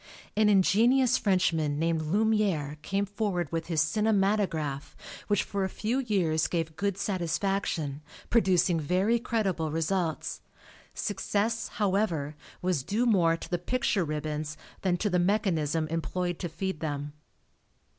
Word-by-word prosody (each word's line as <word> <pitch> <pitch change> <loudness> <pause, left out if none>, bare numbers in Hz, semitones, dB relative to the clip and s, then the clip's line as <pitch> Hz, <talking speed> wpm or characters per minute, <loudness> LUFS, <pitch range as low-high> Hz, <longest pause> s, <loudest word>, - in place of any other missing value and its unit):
An 215 0 +4
ingenious 235 +6 +4
Frenchman 165 -7 +1
named 165 0 +1
Lumiere, 185 -5 +1
came 195 +5 -1
forward 200 -5 -2
with 165 0 -2
his 165 -2 +2
Cinematographe 195 -6 0 0.3
which 205 -2 +2
for 200 -1 -2
a 190 - -1
few 225 +7 -1
years 180 -10 +1
gave 165 -2 -2
good 200 +2 -1
satisfaction, 175 -6 -1 0.3
producing 185 -6 +3
very 185 +9 +2
creditable 195 -9 -1
results. 165 +1 -1 0.5
Success, 210 +3 -1
however, 185 -8 0 0.3
was 180 -6 +1
due 210 - 0
more 175 -8 +3
to - - -8
the 175 - -1
picture 210 0 0
ribbons 155 0 -3 0.2
than 180 -2 +1
to 210 - -1
the 180 -3 +2
mechanism 170 -5 +1
employed 175 +2 -2
to 175 - -3
feed 190 +1 -4
them. 145 -2 -4
180 Hz, 130 wpm, -28 LUFS, 160-205 Hz, 0.5 s, An